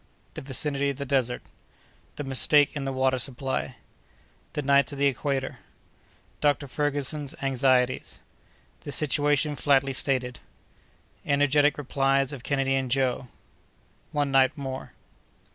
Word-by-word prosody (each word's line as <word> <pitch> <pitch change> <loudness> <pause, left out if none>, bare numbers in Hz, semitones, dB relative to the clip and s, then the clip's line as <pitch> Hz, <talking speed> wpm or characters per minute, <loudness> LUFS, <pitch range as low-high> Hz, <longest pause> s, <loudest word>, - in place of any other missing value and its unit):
—The - - -7
Vicinity 140 +1 0
of 140 - -3
the 140 +1 -5
Desert.—The 130 +2 -5
Mistake 140 +2 +5
in 140 -2 -4
the 135 - -2
Water 130 0 +1
Supply.—The 130 - -6
Nights 140 +1 +3
of - - -7
the 140 - +1
Equator.—Dr. 140 +1 -4
Ferguson's 145 0 -2
Anxieties.—The 130 +1 -2
Situation 145 0 +1
flatly 135 +1 +2
stated.—Energetic 140 +2 -2
Replies 135 0 0
of 135 - -8
Kennedy 135 0 0
and 135 -1 -1
Joe.—One 135 +2 -4
Night 135 +1 +3
more. 135 -2 -6
135 Hz, 100 wpm, -26 LUFS, 130-145 Hz, -, Mistake